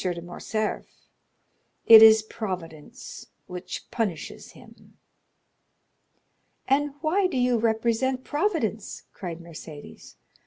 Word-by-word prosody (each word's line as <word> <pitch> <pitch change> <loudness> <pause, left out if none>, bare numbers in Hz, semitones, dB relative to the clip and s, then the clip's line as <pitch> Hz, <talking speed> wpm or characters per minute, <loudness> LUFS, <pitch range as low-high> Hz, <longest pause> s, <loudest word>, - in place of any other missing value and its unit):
de 175 -2 -2
Morcerf; 195 +5 -5 0.7
it 225 -1 +10
is 220 -1 +8
Providence 180 -9 -8 0.2
which 180 0 -7
punishes 200 -10 -4
him." - - -18 1.7
"And 280 +1 +1
why 365 +5 +2
do 340 - -4
you 245 -1 +2
represent 235 +3 0
Providence?" 290 - -2
cried 175 -4 -7
Mercédès. 160 -3 -12
220 Hz, 90 wpm, -25 LUFS, 180-260 Hz, 1.7 s, it